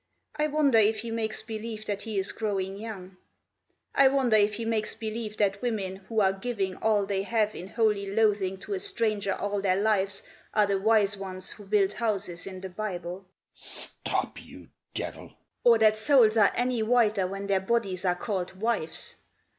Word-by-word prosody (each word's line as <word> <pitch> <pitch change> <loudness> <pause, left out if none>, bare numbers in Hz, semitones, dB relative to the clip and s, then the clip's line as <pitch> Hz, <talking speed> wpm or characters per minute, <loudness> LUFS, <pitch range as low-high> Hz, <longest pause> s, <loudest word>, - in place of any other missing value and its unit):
I 300 0 +1
wonder 285 -6 +3
if 215 0 +3
he 230 0 -5
makes 220 -1 -2
believe 220 0 -6
that 205 -1 -3
he 220 -2 -4
is 195 +1 0
growing 195 -3 -2
young; 195 -3 -8 0.8
I 275 - +6
wonder 265 -4 +3
if 210 0 +4
he 230 - -4
makes 220 -1 0
believe 220 -1 -5
that 200 -1 +1
women 200 -6 -2
who 215 +3 -1
are 190 -1 +3
giving 195 -2 -3
All 215 -2 +2
they 195 -1 -1
have 215 +1 +1
in 180 - -7
holy 210 -2 +1
loathing 205 -3 +2
to 405 - -5
a 390 - -1
stranger 220 - 0
all 205 0 -2
their 190 -1 +2
lives 200 -2 +1 0.3
Are 210 - +5
the 200 -1 0
wise 205 -1 +3
ones 185 -1 -4
who 205 - -11
build 200 -1 +2
houses 200 -7 -2
in 185 -1 -7
the 190 - -6
Bible... 180 -2 -5 0.2
." - - -57
"Stop - - -2
you - - -14 0.3
devil!" - - -6
"... - - -54
Or 235 -1 +7
that 215 -1 +4
souls 230 -2 +5
are 210 -3 +5
any 245 -1 0
whiter 220 -4 +3
when 195 +1 -5
their 195 -1 +1
bodies 195 -3 -1
are 180 -2 +2
called 185 -2 -3
wives. 220 -7 -2
210 Hz, 185 wpm, -28 LUFS, 195-225 Hz, 0.8 s, Or